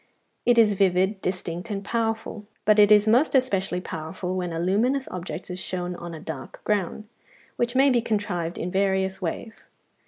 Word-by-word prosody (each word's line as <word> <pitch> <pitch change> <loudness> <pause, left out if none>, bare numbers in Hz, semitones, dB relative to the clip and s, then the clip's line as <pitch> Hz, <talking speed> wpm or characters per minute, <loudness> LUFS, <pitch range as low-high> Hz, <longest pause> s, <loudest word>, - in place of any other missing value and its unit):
It 245 -1 +5
is 220 -3 +6
vivid, 190 +1 +2
distinct, 180 +1 -4
and 200 -1 -3
powerful; 225 -2 -2 0.2
but 215 0 +5
it 205 0 +6
is 210 0 +6
most 250 +7 +4
especially 195 -8 +1
powerful 180 +2 -5
when 180 -2 -2
a 165 - -3
luminous 230 +10 +1
object 175 -1 -6
is 180 - -5
shown 180 -1 -4
on 170 -1 -7
a - - -8
dark 155 -4 -7
ground, 210 +1 -1 0.5
which 240 +1 -1
may 270 +1 +5
be 240 -2 +3
contrived 200 -7 -2
in 180 - -3
various 190 0 0
ways. 205 +6 -5
195 Hz, 175 wpm, -25 LUFS, 180-220 Hz, 0.5 s, is